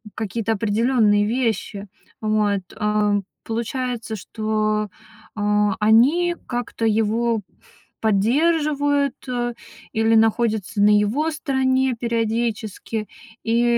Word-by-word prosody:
какие-то 220 +1 -2
определённые 215 0 +2
вещи. 220 -3 -2 0.3
Вот, 210 -2 +1 0.2
а, 210 -1 +1 0.3
получается, 235 0 -3
что, 215 +1 -1 0.5
а, 210 -1 +1
они 285 +12 +4
как-то 240 -2 -3
его 225 +1 +1 0.6
поддерживают, 285 +6 +2
э, 240 -1 -2 0.4
или 225 +1 +2
находятся 220 -3 +1
на 210 +1 +6
его 250 +11 +1
стороне 265 -4 +1
периодически. 225 -2 -2 0.4
И, 230 +1 +2
225 Hz, 85 wpm, -22 LUFS, 210-250 Hz, 0.6 s, на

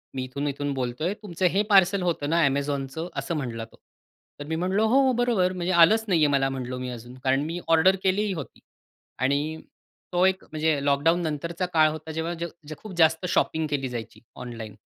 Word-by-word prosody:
मी 130 - -2
इथून-इथून 140 +2 -3
बोलतोय. 130 +7 -2
"तुमचं 185 -2 -3
हे 200 - +3
पार्सल 195 -1 +5
होतं 165 -5 -1
ना 165 +2 +2
Amazonचं," 140 +3 -2
असं 170 - -3
म्हटला 115 -6 -4
तो. 115 - -21 0.6
तर 145 - -6
मी 160 - -2
म्हटलं, 185 +5 0
"हो, 260 +4 +4
बरोबर. 235 -7 +2
म्हणजे 180 0 -2
आलंच 215 +7 +5
नाही 180 -5 +2
आहे 145 - +3
मला," 135 -1 +2
म्हटलो 130 -1 -4
मी, 125 0 -4
"अजून." 120 0 -9
कारण 135 +1 +2
मी 170 +2 -4
ऑर्डर 165 +4 +5
केलीही 195 +1 +1
होती. 155 -6 -8 0.6
आणि, 145 +5 0 0.5
तो 180 +1 +3
एक 190 0 +1
म्हणजे 155 0 0
लॉकडाऊननंतरचा 165 +3 0
काळ 155 -1 +5
होता, 155 +1 -7
जेव्हा 160 +2 -3 0.4
खूप 210 +5 -10
जास्त 160 +1 +3
शॉपिंग 160 -3 +1
केली 135 -3 -2
जायची 120 -2 -7 0.2
ऑनलाईन. 115 -4 -8
160 Hz, 175 wpm, -25 LUFS, 135-180 Hz, 0.6 s, पार्सल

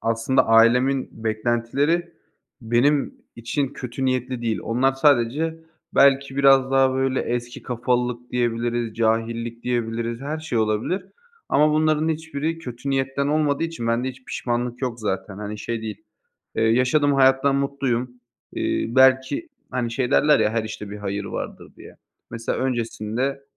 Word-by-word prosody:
aslında 115 +3 +1
ailemin 125 +4 +4 0.2
beklentileri 120 +10 0 0.5
benim 125 +5 +2 0.2
için 130 +4 -2
kötü 125 +1 -5
niyetli 130 -1 -1
değil. 115 -1 -1
Onlar 130 +4 +1
sadece 145 +3 +2 0.4
belki 140 0 +4
biraz 135 -1 +5
daha, 135 -1 +4
böyle, 130 0 0
eski 120 0 -4
kafalılık 125 0 -2
diyebiliriz, 120 -1 -1
cahillik 115 +1 -1
diyebiliriz, 115 -1 -2
her 150 +3 -4
şey 155 -7 -2
olabilir 110 - 0 0.5
ama 150 0 +4
bunların 155 0 +2
hiçbiri 160 0 -3
kötü 130 -2 -6
niyetten 135 +1 0
olmadığı 150 0 +1
için 165 -8 -5
bende 115 +3 0
hiç 130 0 -10
pişmanlık 120 +1 -3
yok 120 -2 -3
zaten. 100 -1 -3
Hani, 105 0 -6
şey 115 +1 -4
değil, 110 -1 -7 0.5
eee, 110 - +1
yaşadığım 125 +6 +3
hayattan 135 +1 +4
mutluyum. 135 -3 -1 0.4
Eee, - - -1
belki, 130 - +3 0.2
hani, 120 -2 -2
şey 125 +2 -1
derler 150 -1 +4
ya, 105 -1 +2
her 115 0 -1
işte 105 -1 -7
bir 105 - -6
hayır 100 0 -4
vardır, - - -6
diye. - - -14 0.3
Mesela, 115 0 -3
öncesinde, 125 +2 -2
125 Hz, 140 wpm, -23 LUFS, 115-140 Hz, 0.5 s, biraz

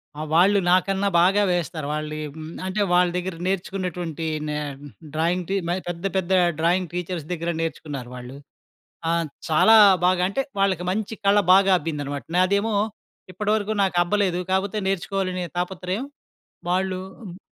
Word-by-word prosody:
ఆ! 150 - -6
వాళ్ళు 195 +4 +5
నాకన్నా 195 +2 +2
బాగా 195 +3 +4
వేస్తారు. 165 -4 -2
వాళ్ళు 155 0 -4 0.5
అంటే 200 +2 -1
వాళ్ళ 180 0 +4
దగ్గర 180 -1 -3
నేర్చుకున్నటువంటి 180 -4 -3 0.2
నే 150 0 -2 0.6
డ్రాయింగ్ 170 +3 0
టీ 195 - 0
మయి 180 +2 -1
పెద్ద 175 +2 -5
పెద్ద 190 0 -1 0.3
డ్రాయింగ్ 175 +2 +1
టీచర్స్ 180 -3 -4
దగ్గర 170 0 -2
నేర్చుకున్నారు 145 -6 -5
వాళ్ళు. 125 +2 -9 0.7
ఆ! - - +2 0.4
చాలా 190 +8 +6 0.3
బాగా 180 0 +3
అంటే 270 - -1 0.2
వాళ్ళకి 190 -3 +1
మంచి 215 +2 -2
కళ 200 +1 +5 0.2
బాగా 195 0 +5
అబ్బిందనమాట. 145 -4 -4
నాదేమో 200 +4 +2 0.6
ఇప్పటి 210 +3 -3
వరకు 215 0 -2
నాకబ్బలేదు. 185 0 +1
కాకపోతే 195 +2 0
నేర్చుకోవాలనే 185 -1 -1
తాపత్రయం 185 +5 -3 0.6
వాళ్ళు 185 +1 0 0.2
హ్మ్. 185 -4 -9
180 Hz, 135 wpm, -23 LUFS, 170-195 Hz, 0.7 s, చాలా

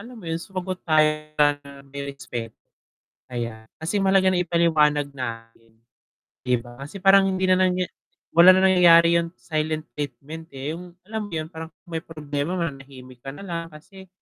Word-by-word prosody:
alam 240 0 -11
mo 175 - -11
yun 165 0 -2
sumagot 185 -1 -5
tayo 155 -1 +5 0.3
ng 140 -1 0
may 140 +1 -7
respecto. 120 -4 -7 0.7
Ayan, 115 -2 -5
kasi 190 +5 -1
mahalaga 190 -1 +4
na 180 - +2
ipaliwanag 155 -4 +2
natin, 115 -2 -7 0.8
'di 125 - +4
ba 120 +1 -13
kasi 145 +8 -8
parang 195 0 +6
hindi 190 0 -1
na 185 0 +4
niya 180 0 -1 0.5
wala 170 +2 +8
na 190 - +3
nangyayari 170 -2 +6
yung 170 - -5
silent 155 -1 -2
treatment, 150 +2 -7
eh, 135 +3 -4
yung 175 +1 -10
alam 215 +1 -5
mo - - -15
yun 155 +2 -4
parang 160 -1 -7 0.2
may 165 -2 -4
problema 150 0 -4
mananahimik 135 -6 -6
ka 135 +3 -8
nalang, 170 -2 -5
kasi 190 +5 -14
160 Hz, 165 wpm, -24 LUFS, 140-180 Hz, 0.8 s, wala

